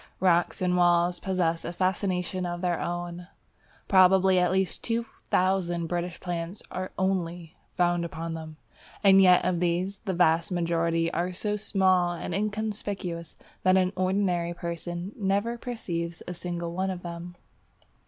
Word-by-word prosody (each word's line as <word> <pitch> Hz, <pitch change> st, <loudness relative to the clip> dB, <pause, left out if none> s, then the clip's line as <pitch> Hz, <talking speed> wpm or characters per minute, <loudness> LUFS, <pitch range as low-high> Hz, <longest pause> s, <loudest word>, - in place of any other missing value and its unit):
Rocks 175 Hz, 0 st, +2 dB
and 180 Hz, 0 st, +2 dB
walls 175 Hz, 0 st, +3 dB
possess 175 Hz, -3 st, 0 dB
a -, -, -4 dB
fascination 185 Hz, 0 st, -1 dB
of 175 Hz, 0 st, -3 dB
their 175 Hz, -2 st, 0 dB
own. 175 Hz, 0 st, -4 dB, 0.6 s
Probably 190 Hz, 0 st, +5 dB
at 180 Hz, -1 st, +2 dB
least 190 Hz, 0 st, -1 dB
2000 185 Hz, -6 st, 0 dB
British 175 Hz, +1 st, -3 dB
plants 175 Hz, +2 st, -4 dB
are 185 Hz, 0 st, -4 dB
only 175 Hz, -3 st, -2 dB, 0.2 s
found 175 Hz, -1 st, +2 dB
upon 165 Hz, 0 st, -5 dB
them, 160 Hz, -1 st, -7 dB, 0.5 s
and 195 Hz, -1 st, +7 dB
yet 180 Hz, -1 st, +6 dB
of 180 Hz, -2 st, +1 dB
these, 180 Hz, +3 st, 0 dB
the 190 Hz, -3 st, -1 dB
vast 170 Hz, +1 st, +3 dB
majority 165 Hz, -1 st, 0 dB
are 175 Hz, +2 st, -1 dB
so 210 Hz, +3 st, -2 dB
small 185 Hz, -4 st, +2 dB
and 175 Hz, -, -5 dB
inconspicuous 205 Hz, -4 st, -3 dB, 0.3 s
that 185 Hz, 0 st, +4 dB
an 185 Hz, 0 st, +2 dB
ordinary 185 Hz, -2 st, 0 dB
person 175 Hz, +2 st, -5 dB
never 205 Hz, +3 st, 0 dB
perceives 175 Hz, -9 st, -4 dB
a 180 Hz, -, -4 dB
single 175 Hz, -1 st, -4 dB
one 190 Hz, +2 st, -1 dB
of 180 Hz, -2 st, -5 dB
them. 175 Hz, 0 st, -7 dB
180 Hz, 145 wpm, -27 LUFS, 170-190 Hz, 0.6 s, and